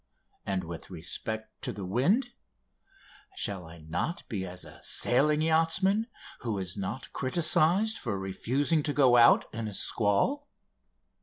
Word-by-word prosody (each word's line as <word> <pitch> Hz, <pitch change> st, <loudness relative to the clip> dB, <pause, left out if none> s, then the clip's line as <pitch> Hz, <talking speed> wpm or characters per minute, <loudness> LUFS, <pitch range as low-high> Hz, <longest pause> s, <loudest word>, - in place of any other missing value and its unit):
and, 95 Hz, -2 st, -1 dB
with 85 Hz, 0 st, -8 dB
respect 110 Hz, +5 st, -5 dB
to -, -, -3 dB
the 100 Hz, -, -7 dB
wind, 185 Hz, -, +1 dB, 1.0 s
"shall 95 Hz, -, -3 dB
I 80 Hz, +1 st, -12 dB
not 85 Hz, -, -4 dB
be 95 Hz, -6 st, -4 dB
as 90 Hz, 0 st, -6 dB
a -, -, -13 dB
sailing 150 Hz, +5 st, +3 dB
yachtsman 165 Hz, +7 st, +2 dB, 0.3 s
who 115 Hz, -4 st, -3 dB
is 90 Hz, -2 st, -4 dB
not 100 Hz, +6 st, -5 dB
criticised 170 Hz, +8 st, +2 dB
for 110 Hz, -5 st, -3 dB
refusing 130 Hz, -, 0 dB
to 145 Hz, 0 st, -2 dB
go 130 Hz, -4 st, +5 dB
out 120 Hz, 0 st, +6 dB
in 115 Hz, -1 st, -4 dB
a 105 Hz, -, -5 dB
squall?" 120 Hz, -, +1 dB
120 Hz, 140 wpm, -29 LUFS, 95-160 Hz, 1.0 s, out